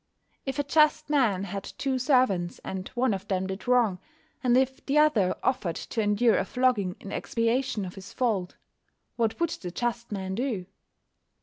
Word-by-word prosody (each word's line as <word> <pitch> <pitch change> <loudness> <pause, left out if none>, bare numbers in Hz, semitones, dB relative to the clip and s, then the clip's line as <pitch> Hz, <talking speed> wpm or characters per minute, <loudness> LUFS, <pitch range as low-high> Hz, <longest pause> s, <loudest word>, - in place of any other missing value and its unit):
If 270 - -2
a 290 - +1
just 305 +1 +3
man 225 -10 +2
had 200 0 -4
two 265 +3 -2
servants, 250 -10 +2
and 190 0 -5
one 250 -2 +2
of 195 +1 -5
them 190 -1 0
did 190 +2 -6
wrong, 235 -7 +3 0.4
and 245 -1 +4
if 265 +1 0
the 285 +2 0
other 240 -12 +4
offered 220 -11 0
to 225 - -3
endure 210 +2 +3
a - - +1
flogging 245 -8 +1
in 200 - -9
expiation 230 -2 0
of 180 - -7
his 195 0 -10
fault, 215 -8 -1 0.6
what 225 +2 0
would 335 -1 +1
the 180 - -5
just 235 +4 -3
man 190 -2 -3
do? 225 -4 -2
230 Hz, 175 wpm, -27 LUFS, 190-260 Hz, 0.6 s, and